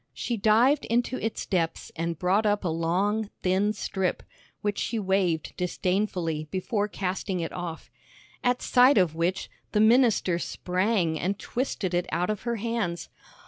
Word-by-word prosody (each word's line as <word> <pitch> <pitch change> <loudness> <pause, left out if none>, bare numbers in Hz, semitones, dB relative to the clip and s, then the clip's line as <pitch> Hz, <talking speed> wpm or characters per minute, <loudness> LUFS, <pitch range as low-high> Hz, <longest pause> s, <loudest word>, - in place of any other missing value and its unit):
She 240 - -2
dived 230 +7 +4
into 240 +2 0
its 225 - -2
depths 165 -4 -1
and 165 0 -2
brought 190 +6 +2
up 205 0 +1
a - - 0
long, 190 +6 0
thin 190 +3 +2
strip, 190 -3 -2 0.4
which 205 -1 -1
she 230 - -1
waved 190 -5 0
disdainfully 180 -3 -1
before 205 +4 -1
casting 190 -1 -3
it 165 - -3
off. 175 -2 -6 0.5
At 245 0 +1
sight 255 +1 +5
of 180 -5 +3
which, 170 +4 -1 0.3
the 210 - +3
minister 220 -6 +4
sprang 180 -3 0
and 195 +2 -1
twisted 215 -8 -3
it 175 0 0
out 180 +4 0
of 210 - -4
her 235 - 0
hands. 225 -6 -2
190 Hz, 150 wpm, -27 LUFS, 175-220 Hz, 0.5 s, sight